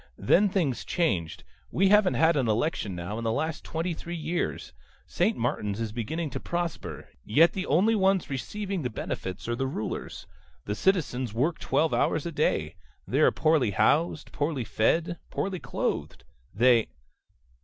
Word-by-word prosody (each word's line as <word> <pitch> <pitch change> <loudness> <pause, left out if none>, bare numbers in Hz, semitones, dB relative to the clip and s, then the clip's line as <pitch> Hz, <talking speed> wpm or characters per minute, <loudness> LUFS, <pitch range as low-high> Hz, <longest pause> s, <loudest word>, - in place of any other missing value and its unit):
Then 195 - +4
things 165 - 0
changed. 95 - -1 0.3
We 190 +2 +3
haven't 210 -2 +5
had 160 0 +4
an 135 -5 +1
election 110 - 0
now 90 +6 -4
in - - -5
the 115 - 0
last 160 +6 -2
twenty 165 +2 -2
three 170 +2 -6
years. 165 - -3 0.3
St. - - 0
Martin's 105 0 -1
is 115 -2 -2
beginning 145 +8 -3
to - - -4
prosper. 145 - -4 0.2
Yet 155 - +4
the 190 -1 -3
only 190 +10 +3
ones 195 -3 +2
receiving 195 +7 -4
the 125 - -2
benefits 95 -4 -5
are 120 - 0
the 135 +2 -1
rulers. 110 -5 -5 0.4
The 105 - -2
citizens 130 - 0
work 150 +8 0
twelve 160 +1 +1
hours 155 - +1
a 170 - -3
day. - - 0 0.3
They - - 0
are - - +6
poorly 155 -7 +2
housed, 155 - +1
poorly 145 -3 -1
fed, 165 +11 +1
poorly 190 -2 -2
clothed. - - -3 0.3
They 115 +2 +4
150 Hz, 160 wpm, -27 LUFS, 115-170 Hz, 0.4 s, are